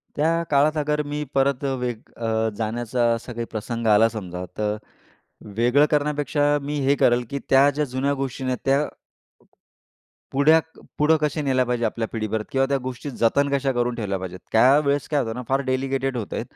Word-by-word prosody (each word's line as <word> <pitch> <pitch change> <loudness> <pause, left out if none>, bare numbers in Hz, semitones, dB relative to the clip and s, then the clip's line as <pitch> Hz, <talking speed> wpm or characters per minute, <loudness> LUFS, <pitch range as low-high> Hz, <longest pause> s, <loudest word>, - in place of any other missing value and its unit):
त्या 165 +3 +1
काळात 150 +2 +3
अगर 150 0 0
मी 145 +1 -4
परत 135 0 +1
अ, 135 - 0
वेग 120 -3 -3 0.2
अ, 110 -1 0
जाण्याचा 120 +2 -1
असा 115 +2 -8
काही 115 0 -4
प्रसंग 115 +1 -3
आला 110 +1 +5
समजा, 90 -5 -6
तर 105 0 0 0.8
वेगळं 125 +6 +4
करण्यापेक्षा 145 0 +1
मी 145 +1 -3
हे 140 - +4
करेल, 120 0 +3
की 140 - -3
त्या 135 +1 +6
ज्या 150 +1 -1
जुन्या 130 +2 -1
गोष्टी 135 -1 -4
आहे 130 - -1
नं, 125 - -1
त्या 140 +2 +2 1.4
पुढया 150 +4 +5 0.4
पुढे 150 +2 +4
कशा 150 +1 0
नेल्या 130 -2 +2
पाहिजे 120 -1 -1
आपल्या 110 +1 -2
पिढीबरोबर, 110 -1 -2
किंवा 135 0 +2
त्या 140 0 +1
गोष्टी 130 +2 -5
जतन 135 +4 +2
कशा 135 -1 +1
करून 120 0 0
ठेवल्या 100 -4 -2
पाहिजेत. 90 0 -7
त्या 125 +5 +6
वेळेस 140 +1 0
काय 150 - +1
होतं 115 -2 -4
ना, 125 - -4
फार 135 +1 +2
डेलिकेटेड 135 0 -1
होता, 110 - -4
130 Hz, 185 wpm, -23 LUFS, 115-145 Hz, 1.4 s, त्या